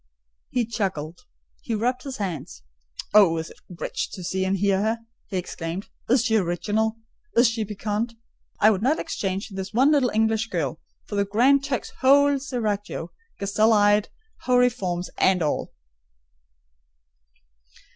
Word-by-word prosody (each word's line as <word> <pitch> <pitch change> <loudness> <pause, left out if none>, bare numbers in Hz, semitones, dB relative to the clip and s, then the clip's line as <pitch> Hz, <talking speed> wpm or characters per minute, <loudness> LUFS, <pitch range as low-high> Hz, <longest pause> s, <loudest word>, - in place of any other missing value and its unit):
He 245 -2 0
chuckled; 185 -8 -3 0.4
he 230 - -2
rubbed 250 +4 0
his 270 -2 -6
hands. 165 - -5 0.5
"Oh, 195 -6 +6
it - - 0
is 160 - -10 0.2
rich 175 - -4
to 185 - -7
see 190 +2 -1
and 190 +1 +1
hear 195 0 +2
her!" 220 +2 0 0.3
he 190 - -3
exclaimed. 175 +1 -5 0.2
"Is 245 0 +4
she 225 -3 +3
original? 215 +4 0 0.4
Is 240 +1 +7
she 225 -1 -1
piquant? 210 +3 -3 0.4
I 215 - +6
would 195 -2 -1
not 275 +7 +2
exchange 195 - -3
this 190 0 -6
one 265 +6 +4
little 280 -5 +3
English 220 0 +1
girl 165 - -2 0.3
for - - -10
the 200 0 +2
Grand 255 +7 +4
Turk's 275 -3 -3
whole 280 +1 +5
seraglio, 210 -9 -3 0.3
gazelle 215 +3 +2
eyes, 205 0 +4 0.4
houri 250 0 +4
forms, 180 -6 -3
and 185 -2 +3
all!" 150 - -1
210 Hz, 145 wpm, -24 LUFS, 190-240 Hz, 0.5 s, Is